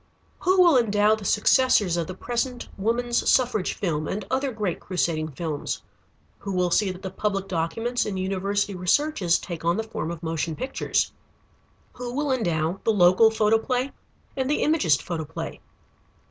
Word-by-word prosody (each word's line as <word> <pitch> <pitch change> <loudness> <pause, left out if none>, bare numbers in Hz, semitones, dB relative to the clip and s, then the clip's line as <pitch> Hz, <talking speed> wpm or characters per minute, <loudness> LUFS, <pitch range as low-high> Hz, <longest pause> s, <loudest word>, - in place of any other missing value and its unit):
Who 370 +1 +2
will 340 -7 +7
endow 210 -2 +3
the 220 -2 -4
successors 210 -3 +3
of 170 -2 -1
the 185 - -6
present 245 +3 -3
woman's 235 +4 0
suffrage 240 -7 +2
film, 155 -6 -2
and 200 0 -3
other 265 +1 0
great 210 -6 -2
crusading 165 -4 -1
films? 155 0 -4 0.6
Who 200 -1 -5
will 180 -1 +1
see 205 +2 +3
that 185 0 -7
the 190 - -4
public 195 -1 -2
documents 195 +8 -1
and 200 -2 -3
university 195 +2 -1
researches 185 - +2
take 170 -3 -7
on 170 +3 +1
the 220 - -1
form 220 -7 -5
of 170 0 -7
motion 160 0 -2
pictures? 260 - -1 0.8
Who 245 0 -6
will 290 0 0
endow 175 -7 0
the 225 - +3
local 185 +2 +5
photoplay 225 +4 +1 0.4
and 265 -1 -1
the 295 - +1
Imagist 185 - +2
photoplay? 160 -4 -5
200 Hz, 160 wpm, -25 LUFS, 175-240 Hz, 0.8 s, will